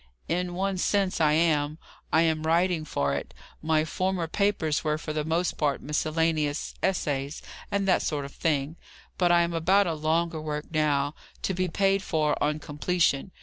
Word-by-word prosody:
"In 175 Hz, +1 st, -1 dB
one 190 Hz, 0 st, -1 dB
sense, 195 Hz, -3 st, +1 dB
I 150 Hz, -1 st, +4 dB
am: 155 Hz, -2 st, +2 dB, 0.3 s
I 160 Hz, -, +4 dB
am 160 Hz, -1 st, +1 dB
writing 165 Hz, 0 st, +1 dB
for 70 Hz, -, -1 dB
it. 70 Hz, -, -5 dB, 0.3 s
My 155 Hz, 0 st, +2 dB
former 185 Hz, +2 st, -1 dB
papers 170 Hz, -4 st, 0 dB
were 150 Hz, -1 st, 0 dB
for 155 Hz, -1 st, -5 dB
the 155 Hz, 0 st, -1 dB
most 165 Hz, +3 st, 0 dB
part 145 Hz, -3 st, +1 dB
miscellaneous 155 Hz, 0 st, -1 dB
essays, 145 Hz, -6 st, -1 dB, 0.3 s
and 200 Hz, -1 st, 0 dB
that 185 Hz, -, +4 dB
sort 145 Hz, -2 st, -2 dB
of 140 Hz, -, -9 dB
thing; 150 Hz, 0 st, -1 dB, 0.4 s
but 175 Hz, -2 st, +4 dB
I 170 Hz, 0 st, +5 dB
am 170 Hz, 0 st, -2 dB
about 190 Hz, +5 st, +3 dB
a 170 Hz, -, -1 dB
longer 160 Hz, +1 st, 0 dB
work 150 Hz, -1 st, -4 dB
now, 145 Hz, -2 st, +1 dB, 0.3 s
to 190 Hz, -, 0 dB
be 185 Hz, 0 st, 0 dB
paid 195 Hz, +3 st, +2 dB
for 155 Hz, -5 st, +1 dB
on 150 Hz, +1 st, +1 dB
completion. 150 Hz, +1 st, 0 dB
160 Hz, 175 wpm, -27 LUFS, 150-180 Hz, 0.4 s, I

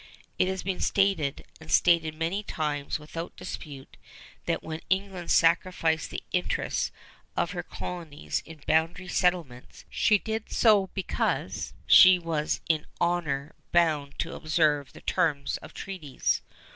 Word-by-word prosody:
It 185 Hz, -, +4 dB
has 190 Hz, 0 st, -2 dB
been 190 Hz, -1 st, -2 dB
stated, 195 Hz, -8 st, +1 dB
and 80 Hz, -, -10 dB
stated 160 Hz, -, +4 dB
many 165 Hz, +6 st, -1 dB
times 150 Hz, -7 st, -2 dB
without 165 Hz, +2 st, -7 dB
dispute, 145 Hz, -6 st, -8 dB, 0.5 s
that -, -, 0 dB
when 160 Hz, 0 st, -5 dB
England 190 Hz, -2 st, -1 dB
sacrificed 165 Hz, -1 st, +2 dB
the -, -, -6 dB
interests 180 Hz, -1 st, -1 dB, 0.5 s
of -, -, +1 dB
her -, -, -3 dB
colonies 165 Hz, -5 st, -5 dB
in 160 Hz, -2 st, -12 dB
boundary 165 Hz, +4 st, +1 dB
settlements, 175 Hz, -10 st, -1 dB
she 210 Hz, -, +4 dB
did 220 Hz, +2 st, -4 dB
so 210 Hz, -4 st, +4 dB
because 195 Hz, -, -2 dB
she 185 Hz, -1 st, +9 dB
was 165 Hz, -3 st, -2 dB
in 155 Hz, -2 st, +1 dB
honor 160 Hz, -5 st, 0 dB, 0.2 s
bound 155 Hz, -5 st, +2 dB
to -, -, -3 dB
observe 155 Hz, -3 st, +1 dB
the -, -, -13 dB
terms 140 Hz, -3 st, 0 dB
of -, -, -12 dB
treaties. 170 Hz, -9 st, -2 dB
165 Hz, 130 wpm, -27 LUFS, 150-185 Hz, 0.5 s, she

